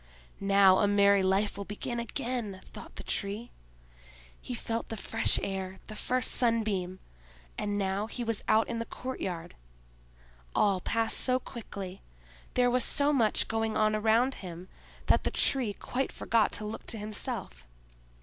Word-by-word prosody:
"Now 195 -1 +6
a 205 - +4
merry 200 -1 +5
life 195 +2 +1
will - - -2
begin 210 +4 -4
again," 235 -3 -3
thought - - -11
the - - -7
Tree. 205 +4 -2 0.9
He 250 - -5
felt 230 0 -3
the 225 - -4
fresh 225 +3 +3
air, 190 -1 -3
the 215 - -8
first 250 +4 +1
sunbeam—and 185 - -2
now 195 +1 0
he 240 +2 -4
was 230 -3 -2
out 220 +1 +4
in 235 -1 -3
the 230 - -2
courtyard. 185 -10 -5 1.0
All 195 -3 +3
passed 225 +3 0
so 255 -1 +2
quickly, 200 -7 -7 0.5
there 245 -1 +4
was 250 0 +3
so 290 +1 +2
much 225 -6 +3
going 225 -1 0
on 215 0 +3
around 225 +5 +3
him, 180 -1 -8 0.4
that - - +4
the - - +1
Tree 250 -7 +2
quite 260 +6 -2
forgot 225 -2 +2
to 210 - -3
look 210 - -6
to 225 - -2
himself. 205 - -4
215 Hz, 150 wpm, -30 LUFS, 195-230 Hz, 1.0 s, Now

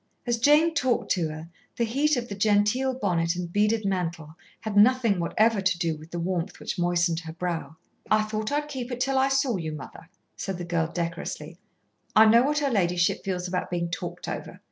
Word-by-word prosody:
As 240 -1 0
Jane 300 +6 +5
talked 260 -5 0
to 170 -4 +1
her, 155 +1 -7 0.3
the 235 - 0
heat 280 +6 +1
of 240 0 -3
the 205 - -6
genteel 210 +6 +2
bonnet 175 -7 0
and 175 -1 -5
beaded 210 +1 +2
mantle 170 -5 -2 0.3
had 215 -2 -4
nothing 225 -2 +4
whatever 215 +5 +2
to 185 -2 +1
do 165 -2 -1
with 155 +1 -13
the 175 - -4
warmth 175 0 -2
which - - -4
moistened 175 -1 +1
her 160 -2 -8
brow. 165 -3 -4 0.3
"I 215 0 +4
thought 215 +1 -3
I'd 295 +1 0
keep 260 -4 -5
it 245 - -4
till 270 +1 +1
I 265 +1 +3
saw 270 -5 +1
you, 160 -3 -4
mother," 155 +3 -10 0.3
said 195 -2 -4
the 175 - -5
girl 165 -1 0
decorously. 170 -1 -5 0.6
"I 220 - +8
know 230 +2 +6
what 295 +3 +1
her 285 -2 +1
ladyship 175 -5 +1
feels 180 -2 -2
about 180 0 -2
being 170 -1 -2
talked - - -5
over. - - -6
195 Hz, 205 wpm, -26 LUFS, 170-240 Hz, 0.6 s, I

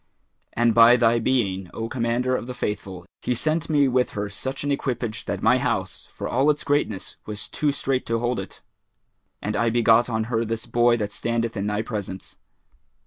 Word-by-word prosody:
And 120 0 +3
by 115 +2 +8
thy 115 0 +3
being, 100 -7 0
O 115 - -3
Commander 120 +1 0
of 120 - -4
the 125 - -6
Faithful, 95 -6 -4 0.2
he 125 - -1
sent 155 +6 0
me 145 -3 +4
with 125 -1 +2
her 100 0 -2
such 130 +7 -4
an 145 - -1
equipage 120 -5 -2
that - - -4
my 125 +3 +4
house, 105 -7 -2
for - - -5
all 135 +5 +2
its 150 0 +1
greatness, 140 -9 -1
was 105 -3 -5
too 150 -1 0
strait 135 -2 -1
to 115 - +1
hold 120 +1 -1
it! - - -8 0.8
And 105 +1 -2
I 115 -1 +2
begot 120 +1 +4
on 110 -1 0
her 115 0 -1
this 115 0 -3
boy 120 0 +3
that 105 -2 -3
standeth 115 +2 -2
in 100 0 -2
thy 105 +1 -1
presence." 100 -5 -6
115 Hz, 195 wpm, -24 LUFS, 110-125 Hz, 0.8 s, by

